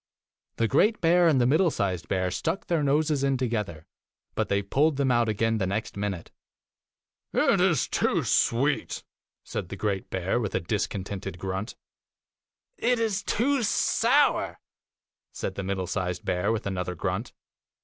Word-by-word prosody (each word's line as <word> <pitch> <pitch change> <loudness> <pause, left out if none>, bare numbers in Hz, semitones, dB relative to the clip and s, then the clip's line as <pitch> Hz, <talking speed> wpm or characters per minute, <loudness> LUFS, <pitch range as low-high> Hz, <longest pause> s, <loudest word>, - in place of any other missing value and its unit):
The 115 - +1
great 210 - +3
bear 175 +1 +4
and 150 -5 +4
the 120 - +3
middle 160 +8 +4
sized 95 - -2
bear 95 -1 0
stuck 165 - -2
their 170 -3 +1
noses 145 0 +1
in 135 -1 +2
together, 105 -11 -3 0.5
but - - -1
they 100 0 +1
pulled 145 +8 +2
them 135 -2 +2
out 120 -2 +2
again 110 +1 +1
the 95 - 0
next 100 +3 -3
minute. 100 -4 -4 1.0
9 - - +3
'It - - +2
is - - +3
too - - +1
sweet,' 140 +5 +1 0.4
said - - -5
the - - -5
great 100 -3 -2
bear, 95 +5 -1
with 110 -5 -3
a - - +2
discontented 95 0 -3
grunt. 95 +5 -4 1.0
'It 245 +1 +2
is 220 -4 0
too 265 +4 +1
sour,' 220 - +2 0.7
said - - -4
the - - -4
middle 95 -1 -2
sized 90 -1 -3
bear, 95 +3 0
with 115 0 -2
another 90 -2 -3
grunt. 95 +6 -3
110 Hz, 160 wpm, -27 LUFS, 95-145 Hz, 1.0 s, bear